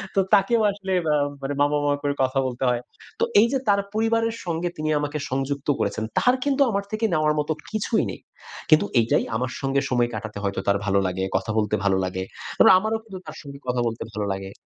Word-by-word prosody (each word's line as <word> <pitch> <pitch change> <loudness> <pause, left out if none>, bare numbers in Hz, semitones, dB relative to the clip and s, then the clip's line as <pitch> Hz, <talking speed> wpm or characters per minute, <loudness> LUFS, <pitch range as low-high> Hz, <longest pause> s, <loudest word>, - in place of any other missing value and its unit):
তো - - +4
তাকেও 220 +4 +4
আসলে 195 -1 -4 0.2
আম 145 -1 +1 0.3
মামা, 145 +1 +3
মামা 145 0 +2
করে 145 0 +1
কথা 130 +1 +1
বলতে 125 +1 -4
হয়। 120 -1 0 0.4
তো - - +2 0.2
এই 235 - +6
যে 270 - +2
তার 200 -1 +4
পরিবারের 225 +1 +1
সঙ্গে 170 0 -1
তিনি 155 0 -2
আমাকে 145 +1 -2
সংযুক্ত 135 +1 -2
করেছেন। 110 - -1 0.2
তার 250 +1 +4
কিন্তু 280 0 +1
আমার 200 0 -1
থেকে 215 +1 0
নেওয়ার 155 -1 +2
মতো 150 +1 0 0.2
কিছুই 215 +1 0
নেই। - - -9 0.5
কিন্তু 155 +5 +6
এইটাই 115 - +2
আমার 125 +2 -1
সঙ্গে 135 0 +1
সময় 120 -1 +2
কাটাতে 105 -1 -6
হয়তো 100 -1 -1
তার 100 0 +4
ভালো 100 0 +2
লাগে, 95 +1 -2
কথা 110 - -3
বলতে 105 0 +1
ভালো 95 -1 +3
লাগে। 95 0 -3 0.4
এবং - - +8
আমারও 220 +3 0
কিন্তু 195 -4 -9
তার 155 - -8
সঙ্গে 140 -2 -10
কথা 125 -1 0
বলতে 115 0 -4
ভালো 105 0 -2
লাগে। 95 0 -6
145 Hz, 210 wpm, -24 LUFS, -, 0.5 s, এবং